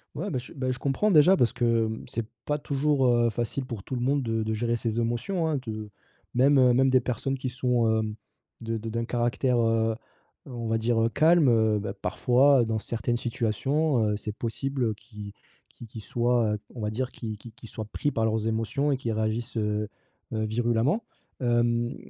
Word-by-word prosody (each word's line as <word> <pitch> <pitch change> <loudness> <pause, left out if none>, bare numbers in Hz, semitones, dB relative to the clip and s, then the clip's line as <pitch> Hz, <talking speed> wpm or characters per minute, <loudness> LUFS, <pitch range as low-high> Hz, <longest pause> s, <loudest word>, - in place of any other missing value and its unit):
Ouais, 190 +7 -3
bah, 130 - -1
je, 125 - -11
bah, 130 -2 -2
je 125 - -4
comprends 170 +10 +1
déjà 175 +4 +6
parce 120 - +2
que, 115 -2 +2
mmh, 110 0 -6
c'est 115 -1 -3 0.2
pas 150 0 0
toujours, 140 -1 +1
heu, 120 -1 +3
facile 120 +4 -3
pour 110 -6 -6
tout 130 - -5
le 120 - -3
monde 135 +2 +1
de 115 -1 -1
de 110 0 -2
gérer 120 +2 0
ses 115 0 -2
émotions 120 +10 -1
hein, 150 -4 0
de 110 -1 -5 0.4
même, 135 +3 +4
heu, 125 -1 +5
même 135 +1 +4
des 130 0 +5
personnes 130 +2 -2
qui 130 -1 -3
sont, 125 -2 +1
hem, 110 -1 -3 0.5
de 115 0 -2
de 110 +1 -5
d'un 115 +1 -2
caractère, 120 +1 0
heu, 115 0 +2 0.6
heu, - - -9
on 115 -2 -4
va 115 0 +1
dire 115 +1 0 0.2
calme, 160 -1 +5
heu, 110 -2 +3
bah, 100 - -4
parfois 130 0 +3
dans 110 -1 -1
certaines 120 +2 -2
situations, 125 +5 0
heu, 105 - -1
c'est 105 0 -4
possible 120 -1 -2
qu'ils 105 -3 -10 0.4
qu'ils 115 - -12
qu'ils 110 0 -9
soient, 120 -2 +1
heu, 105 - -3
on 120 - -7
va 105 - -1
dire, 130 +4 -3
qu'ils 110 -3 -6
qu'ils 115 +2 -12
qu'ils 115 - -13
soient 110 - -6
pris 145 +7 -2
par 110 0 0
leurs 110 0 0
émotions 115 +6 0
et 135 - +1
qui 120 -3 -3
réagissent, 110 +2 -2
heu, 105 0 -1 0.5
heu, 110 0 -1
virulemment. 120 - +1 0.4
Hem, 120 0 +1
120 Hz, 205 wpm, -27 LUFS, 110-130 Hz, 0.6 s, déjà